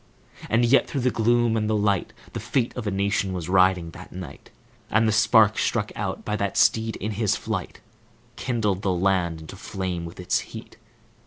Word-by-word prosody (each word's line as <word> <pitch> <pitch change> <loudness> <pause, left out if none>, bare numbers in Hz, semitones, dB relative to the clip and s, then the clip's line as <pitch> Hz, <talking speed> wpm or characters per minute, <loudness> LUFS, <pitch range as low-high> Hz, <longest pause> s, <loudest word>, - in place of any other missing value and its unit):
And 115 +2 +3
yet, 130 +4 +4
through 140 - -2
the 125 0 +2
gloom 120 0 +2
and 110 -1 0
the 110 - +2
light, 100 -3 +1 0.2
The - - -3
fate 125 -3 -1
of 120 -4 -4
a - - +2
nation 100 0 0
was 90 -3 -4
riding 90 -2 +3
that 90 +2 -12
night; 90 -1 -9 0.4
And 110 +2 +3
the - - +3
spark 110 0 +4
struck 105 -3 0
out 95 -3 -4
by 105 - -1
that 100 -1 -2
steed, 110 +2 +3
in 105 +3 -4
his 105 -1 +1
flight, - - -5 0.5
Kindled 105 -6 -1
the 95 - 0
land 90 -3 0
into 80 +4 -10
flame 95 -3 -4
with 85 +2 -10
its 90 - +1
heat. - - -10
100 Hz, 190 wpm, -24 LUFS, 95-110 Hz, 0.5 s, yet